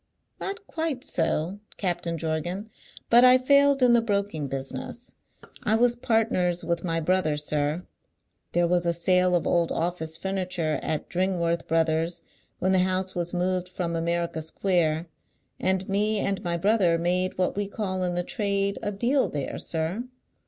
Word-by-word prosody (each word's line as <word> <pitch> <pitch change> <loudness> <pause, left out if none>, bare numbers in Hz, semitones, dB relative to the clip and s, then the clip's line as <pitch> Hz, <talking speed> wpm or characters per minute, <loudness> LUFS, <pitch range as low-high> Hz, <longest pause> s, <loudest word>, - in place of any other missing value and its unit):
"Not 400 +1 -5
quite 320 -8 -3
so, 165 +3 0 0.2
Captain 175 -3 -1
Jorgan; 170 +7 -3 0.4
but 240 +1 +8
I 255 0 +8
failed 280 +1 +4
in 245 -1 +6
the 235 - +5
broking 200 -9 -1
business. 135 - -5 0.5
I 220 - +2
was 240 +1 +3
partners 220 -7 +1
with 170 -1 -1
my 165 -2 0
brother, 165 -2 +1
sir. 150 +2 -1 0.7
There 175 0 +3
was 175 0 +1
a 170 - +2
sale 180 +1 +3
of 175 - 0
old 170 -1 +2
office 165 -1 -2
furniture 185 -5 -2
at 155 - -2
Dringworth 175 -2 0
Brothers' 165 +1 0 0.3
when 185 - +1
the 190 - +4
house 185 +1 0
was 175 -1 -2
moved 180 0 -1
from 175 -2 -3
America 170 -1 -1
Square, 160 -1 0 0.5
and 190 0 0
me 210 +2 +1
and 195 -1 -1
my 170 -1 -1
brother 185 -2 +3
made 180 +2 0
what 185 - 0
we 205 0 -1
call 195 -2 -3
in 180 -1 -1
the 175 - 0
trade 200 -3 0
a 205 - -2
Deal 240 +7 +1
there, 140 -3 -4
sir. 170 +8 -2
180 Hz, 160 wpm, -26 LUFS, 165-200 Hz, 0.7 s, but